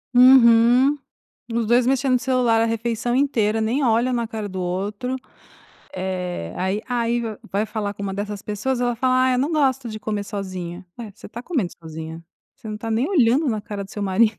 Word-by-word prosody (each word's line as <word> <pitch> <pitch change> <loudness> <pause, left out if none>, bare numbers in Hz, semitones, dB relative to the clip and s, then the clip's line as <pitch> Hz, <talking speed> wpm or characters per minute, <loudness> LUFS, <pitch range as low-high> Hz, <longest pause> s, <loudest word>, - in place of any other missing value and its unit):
Uhum. 250 +2 +6 0.6
Os 235 -1 0
2 240 +1 +4
mexendo 265 0 +2
no - - +4
celular 245 -3 +2
a - - +3
refeição 230 +1 -1
inteira, 225 -6 +1
nem 245 +6 0
olha 235 +2 +2
na 235 -1 0
cara 220 -3 -5
do 185 -1 -5
outro, 200 +8 -3 0.8
eh, 180 - -4
aí 190 +3 -1
aí 240 -1 0 0.3
vai 205 +3 0
falar 205 -2 -4
com 200 - -6
uma 195 - -3
dessas 205 0 -5
pessoas 225 +5 -2
ela 245 -1 0
fala: 255 +1 +2
"Ai, 260 - +3
eu 250 - +1
não 285 +5 0
gosto 270 -5 +1
de 215 0 -6
comer 210 -1 -3
sozinha", 185 -3 -6
ué, 225 -3 -7
você - - -13
está 235 - -8
comendo 250 - -2
sozinha, 160 +1 -8 0.3
você 220 - -12
não 215 - -4
está 225 +1 -5
nem 245 - +1
olhando 275 -3 +3
na 215 -2 -1
cara 205 -1 -6
do 195 - -12
seu 205 -1 -5
mari 210 +3 +2
225 Hz, 200 wpm, -22 LUFS, 200-250 Hz, 0.8 s, Uhum